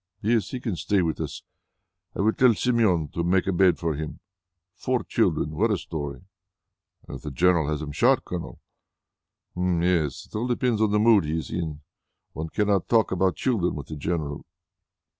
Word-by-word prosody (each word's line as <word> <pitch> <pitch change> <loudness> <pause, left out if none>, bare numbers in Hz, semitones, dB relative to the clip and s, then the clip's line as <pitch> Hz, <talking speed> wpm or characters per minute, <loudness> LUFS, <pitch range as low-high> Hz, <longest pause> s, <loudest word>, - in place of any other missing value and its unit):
"Yes, 115 0 +1
he 130 - -4
can 110 -6 -3
stay 100 +2 +1
with 80 -1 -2
us. - - -5 0.7
I - - 0
will 110 +2 +3
tell 125 -3 +4
Somione 105 - +1
to 85 - -1
make 90 +2 +2
up - - -3
a 90 - -1
bed 95 -1 +4
for 80 -2 -1
him. 75 +1 -6 0.5
Four - - -1
children! 75 - 0
What 105 +9 +1
a 105 - +1
story!" 75 -4 -6 0.8
"And - - -6
if - - -16
the - - -5
general 85 +1 +2
has 75 0 -2
him 75 - -5
shot, 120 - +3
Colonel?" 90 -2 -6 0.9
"Hm! 90 -1 0
yes.... 85 -6 0
It - - -14
all 115 +4 -1
depends 120 -2 0
on 110 - +3
the 105 - +2
mood 105 -4 +5
he 80 +2 -1
is 80 - -5
in. 80 -4 -4 0.5
One 80 +2 -5
cannot 100 0 0
talk 115 -3 +3
about 95 -2 +1
children 105 -9 0
with 75 -1 -7
the 80 - -5
general." 75 -1 -3
90 Hz, 195 wpm, -25 LUFS, 80-105 Hz, 0.9 s, mood